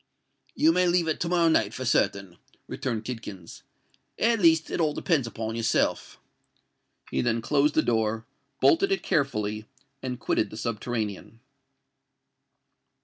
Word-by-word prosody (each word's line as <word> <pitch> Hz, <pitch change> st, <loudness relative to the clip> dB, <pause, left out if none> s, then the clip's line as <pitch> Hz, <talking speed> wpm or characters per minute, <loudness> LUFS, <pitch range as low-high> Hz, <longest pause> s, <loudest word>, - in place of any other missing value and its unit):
"You 160 Hz, -, +4 dB
may 180 Hz, +1 st, +2 dB
leave 175 Hz, -1 st, +2 dB
it 160 Hz, -, -1 dB
to 170 Hz, -, -2 dB
morrow 170 Hz, -2 st, +3 dB
night 110 Hz, -9 st, +2 dB
for 130 Hz, -, -5 dB
certain," 100 Hz, -6 st, 0 dB, 0.3 s
returned 115 Hz, -4 st, -4 dB
Tidkins: 105 Hz, -8 st, -8 dB, 0.6 s
"at 230 Hz, 0 st, +2 dB
least, 160 Hz, -3 st, +3 dB
it -, -, -1 dB
all 150 Hz, -2 st, +1 dB
depends 150 Hz, -9 st, 0 dB
on 110 Hz, -1 st, -5 dB
yourself." 115 Hz, -1 st, 0 dB, 0.9 s
He -, -, 0 dB
then 115 Hz, -1 st, 0 dB
closed 145 Hz, +5 st, +1 dB
the 155 Hz, -, +4 dB
door, 110 Hz, -1 st, 0 dB, 0.4 s
bolted 390 Hz, +3 st, +4 dB
it 390 Hz, -, 0 dB
carefully, 110 Hz, -, -1 dB, 0.3 s
and 125 Hz, -2 st, -4 dB
quitted -, -, 0 dB
the 110 Hz, -, -9 dB
subterranean. 115 Hz, -1 st, -4 dB
120 Hz, 140 wpm, -26 LUFS, 110-160 Hz, 0.9 s, You